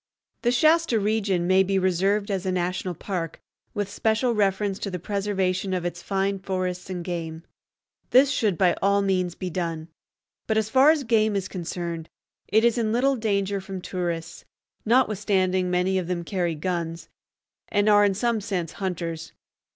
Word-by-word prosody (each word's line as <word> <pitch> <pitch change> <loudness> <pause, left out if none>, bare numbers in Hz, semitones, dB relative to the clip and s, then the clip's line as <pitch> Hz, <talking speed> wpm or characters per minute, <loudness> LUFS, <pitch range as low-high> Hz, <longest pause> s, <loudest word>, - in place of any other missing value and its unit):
The 240 - +2
Shasta 310 -1 +3
region 200 -4 0
may 185 +1 +5
be 190 0 +1
reserved 195 +3 +1
as 190 -2 -1
a - - +1
national 180 0 -2
park, 170 -2 -4 0.4
with 205 -2 -1
special 220 +4 +1
reference 200 -1 0
to 200 - -3
the 180 - -3
preservation 190 -1 -1
of 175 -1 -3
its 175 0 -4
fine 195 0 -1
forests 185 -1 -3
and 180 -2 -5
game. 165 -2 -4 0.7
This 270 +2 +5
should 210 - +1
by 180 -3 +4
all 200 0 +3
means 185 -3 0
be 185 -2 -5
done; 165 -2 -3 0.6
but, 220 - +1
as 220 0 0
far 265 +4 +6
as 310 -2 +3
game 220 -3 +2
is 190 -2 -1
concerned, 170 -2 -5 0.4
it 220 +4 +3
is 235 0 +3
in 220 -2 0
little 265 +4 +2
danger 200 -3 -1
from 190 0 -6
tourists, 170 -2 -4 0.4
notwithstanding 200 -6 +2
many 180 +1 +1
of 175 - -4
them 175 -1 -2
carry 175 -2 -1
guns, 165 0 -3 0.6
and 205 0 +1
are 205 -1 +6
in 200 -1 +2
some 230 +1 0
sense 185 -6 -3
hunters. 170 -4 -4
190 Hz, 165 wpm, -25 LUFS, 180-210 Hz, 0.7 s, far